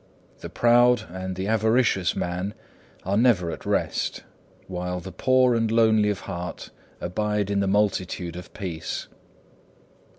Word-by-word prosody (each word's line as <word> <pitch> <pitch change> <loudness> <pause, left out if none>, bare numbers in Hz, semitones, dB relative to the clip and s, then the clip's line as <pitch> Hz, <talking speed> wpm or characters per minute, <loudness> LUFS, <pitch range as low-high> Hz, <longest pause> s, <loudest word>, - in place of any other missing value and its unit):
The - - -7
proud 120 -1 +4
and 95 0 -5
the 95 +1 -3
avaricious 110 -3 +2
man 90 +4 -3 0.5
are 95 +2 -1
never 105 -7 +3
at - - -8
rest; - - -1 0.4
while 90 0 -4
the 95 +2 -8
poor 130 +6 +3
and 115 -1 +1
lowly 110 -2 +4
of 105 - -2
heart 90 -2 -6 0.3
abide 105 +2 -1
in 100 - +1
the 100 - +1
multitude 95 -4 0
of 90 0 -9
peace. 85 -6 -5
100 Hz, 135 wpm, -25 LUFS, 90-110 Hz, 0.5 s, proud